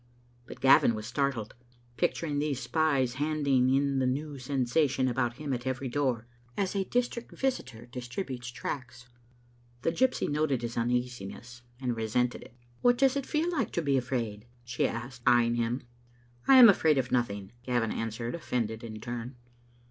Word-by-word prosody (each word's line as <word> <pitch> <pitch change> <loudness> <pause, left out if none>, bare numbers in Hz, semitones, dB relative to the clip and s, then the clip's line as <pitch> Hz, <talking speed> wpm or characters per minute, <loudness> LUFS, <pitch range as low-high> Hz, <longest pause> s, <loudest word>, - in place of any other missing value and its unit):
But - - -10
Gavin 130 -3 +6
was 110 0 -6
startled, 125 -3 -1 0.4
picturing 160 -3 0
these 145 -3 -1
spies 140 -5 +1
handing 140 -4 +2
in 140 0 +2
the 130 - +2
new 140 +2 -3
sensation 130 +1 +1
about 120 -1 0
him 145 -2 -3
at 125 +1 -4
every 130 0 -2
door, 125 -3 0 0.3
as 195 -2 0
a 195 -1 0
dis 245 +3 +1
trict 235 -1 -9
visitor 245 - -2
distributes 125 +1 -5
tracts. 125 0 -6 0.7
The 165 - +2
gypsy 255 +9 +1
noted 145 -4 0
his 120 0 -4
uneasiness 120 -1 -3 0.2
and 125 -3 -1
resented 115 +2 0
it. 120 - -14 0.2
" 120 - -32
What 245 0 +4
does 270 0 +4
it 280 -1 -2
feel 320 +3 0
like 275 - 0
to 170 - 0
be 140 -2 +2
afraid?" 120 -4 -2 0.2
she 120 +1 0
asked, 120 +2 -6
eye 120 -1 +6
ing 115 - 0
him. 120 +2 -1 0.6
"I 270 - +8
am 250 -2 +11
afraid 160 -7 +4
of 130 -2 0
nothing," 100 -5 -1
Gavin 120 -3 0
answered, 115 +1 -3
offended 115 -8 -2
in 110 -2 -7
turn. 120 +2 -5
125 Hz, 170 wpm, -29 LUFS, 120-145 Hz, 0.7 s, am